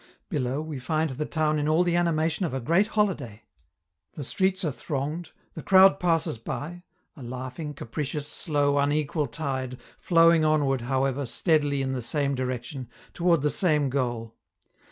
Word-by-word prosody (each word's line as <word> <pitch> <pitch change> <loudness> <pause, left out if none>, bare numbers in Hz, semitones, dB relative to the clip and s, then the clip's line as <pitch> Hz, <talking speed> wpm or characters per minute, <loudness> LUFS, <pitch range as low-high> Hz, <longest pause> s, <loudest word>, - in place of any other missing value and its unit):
Below, 140 - -1
we 155 -4 -6
find 155 +3 -1
the 150 +4 -4
town 155 -1 0
in 150 +1 0
all 160 +3 +4
the 175 -1 +1
animation 165 0 +1
of 155 -7 -2
a - - -1
great 170 - +2
holiday. 160 - -1 0.7
The 145 - -6
streets 190 +6 0
are 155 - 0
thronged; 150 +5 -4 0.2
the 160 - -7
crowd 190 -4 +6
passes 165 -9 0
by 175 +9 -6 0.3
a 145 - -12
laughing, 130 +4 -6
capricious, 145 +4 -4
slow, 145 -2 +1
unequal 145 +1 0
tide, 130 -1 -4 0.2
flowing 165 -2 +5
onward, 145 -4 +2
however, 135 +2 -1
steadily 145 0 +1
in 130 - -2
the 130 -1 -2
same 140 +3 0
direction, 130 0 -4 0.2
toward 170 -4 +2
the 150 - +2
same 150 -7 +2
goal. 120 -4 -2
145 Hz, 155 wpm, -26 LUFS, 130-165 Hz, 0.7 s, crowd